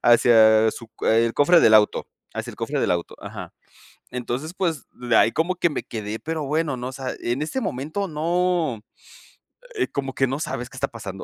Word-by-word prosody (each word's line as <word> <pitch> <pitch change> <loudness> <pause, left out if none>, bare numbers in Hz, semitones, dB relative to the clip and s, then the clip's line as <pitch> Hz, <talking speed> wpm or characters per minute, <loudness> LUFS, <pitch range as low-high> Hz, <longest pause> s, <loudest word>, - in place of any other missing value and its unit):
hacia 110 -2 +6
su 115 - -10
el 115 +1 +3
cofre 165 +4 +5
del 110 - +6
auto, 105 -1 +4 0.3
hacia - - -4
el - - -13
cofre - - -2
del - - +1
auto 85 -1 -1
Ajá. - - -8 0.6
Entonces, 125 +6 -4
pues, 170 -6 -2
de 120 -2 -1
ahí 115 - +5
como 175 +3 0
que 170 -1 +2
me 145 - -4
quedé 110 -1 -5
pero 160 -2 -3
bueno 150 -2 -1
no, 125 +1 -5
o - - -7
sea 130 -1 -5
en 120 +4 -1
este 255 +13 -2
momento 155 - -3
no, 165 -5 0 0.9
eh, 405 - 0
como 135 -1 -4
que 135 - +1
no 135 +3 -3
sabes 125 -5 -4
qué 130 - -13
está 140 - 0
pasando. 100 -4 -8
130 Hz, 200 wpm, -23 LUFS, 115-160 Hz, 0.9 s, hacia